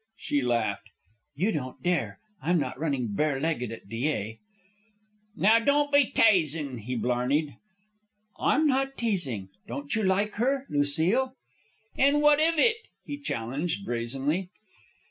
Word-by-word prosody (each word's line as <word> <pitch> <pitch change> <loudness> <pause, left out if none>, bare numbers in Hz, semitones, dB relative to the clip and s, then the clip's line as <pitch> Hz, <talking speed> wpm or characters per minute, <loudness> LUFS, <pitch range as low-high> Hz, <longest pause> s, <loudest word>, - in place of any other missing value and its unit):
She 145 - -1
laughed. 110 -4 -1 0.5
"You 190 +10 +1
don't 130 -8 -5
dare. 150 - 0 0.2
I'm 175 +3 +2
not 145 - -3
running 140 -7 -1
barelegged 140 0 0
at 115 - -9
Dyea." 115 -2 -2 1.0
"Now 220 +4 +5
don't 290 +4 +2
be 285 -3 +5
tasin'," 155 - +2
he 125 +4 -4
blarneyed. 125 +6 0 0.8
"I'm 305 +3 +3
not 270 -1 +1
teasing. 145 - -2 0.2
Don't 285 +3 -5
you 220 - +1
like 200 +2 +1
her? 270 +2 +1
Lucile?" 165 - +1 0.6
"An' 280 +2 +4
what 295 0 +5
iv 325 +1 +3
it?" 445 +8 +4 0.3
he 290 - -5
challenged, 150 - -3
brazenly. 135 +9 -2
160 Hz, 125 wpm, -27 LUFS, -, 1.0 s, Now